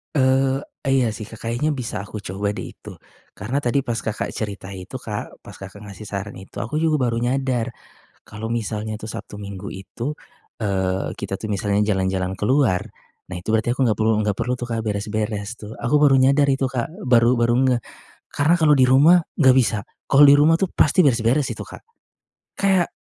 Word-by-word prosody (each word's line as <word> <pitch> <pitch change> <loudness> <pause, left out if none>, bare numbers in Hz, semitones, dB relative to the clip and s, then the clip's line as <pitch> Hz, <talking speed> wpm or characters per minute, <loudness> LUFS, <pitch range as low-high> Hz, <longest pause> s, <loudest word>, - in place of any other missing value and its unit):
Eee, 135 0 +2 0.2
iya 130 -4 +2
sih 110 0 -7
Kak 110 0 -12
kayaknya 125 +7 -1
bisa 125 -7 -4
aku 105 0 -8
coba 100 +2 -3
deh - - -6
itu. - - -12 0.4
Karena 120 +8 -2
tadi 140 0 0
pas 115 -2 -2
Kakak 110 0 -3
cerita 100 -3 -5
itu 95 +5 -9
Kak, 110 -5 -6
pas - - -12
Kakak 100 +2 -11
ngasih 105 +1 -10
saran 100 +1 -5
itu, 95 - -7
aku 150 +8 -2
juga 160 -1 +2
baru 115 0 -1
nyadar. 125 -1 -1 0.5
Kalau 110 +2 -7
misalnya 110 -1 -3
tuh 110 - -7
Sabtu 105 -2 -8
Minggu 100 0 -7
itu, 115 +9 -6 0.4
eee, 95 -3 -1
kita 95 - -4
tuh 110 - -4
misalnya 100 +1 0
jalan-jalan 95 -1 -1
keluar, 110 -4 +2 0.4
nah 90 - -7
itu 90 - -4
berarti 110 +2 +1
aku 135 - -3
enggak 110 -5 +1
perlu 110 +1 +3
enggak 105 -2 -1
perlu 125 - 0
tuh 120 0 -6
Kak 115 - -1
beres-beres 105 0 -2
tuh, 110 +1 -9
aku 120 +5 0
baru 145 -2 +5
nyadar 140 +2 +4
itu 135 0 +1
Kak, 120 -3 -2 0.2
baru 120 0 +5
baru 120 0 +2
ngeh. 125 -3 +2 0.5
Karena 155 +4 +3
kalau 155 -2 +5
di 130 - +5
rumah 150 +7 +6 0.2
enggak 130 -4 +6
bisa. 115 -5 +2 0.3
Kalau 140 +2 +6
di 140 - +8
rumah 160 +3 +5
tuh 190 - 0
pasti 165 +4 +3
beres-beres 125 +2 +2
itu - - -6
Kak. - - -11 0.7
Kayak 190 -3 +2
115 Hz, 190 wpm, -22 LUFS, 105-135 Hz, 0.7 s, di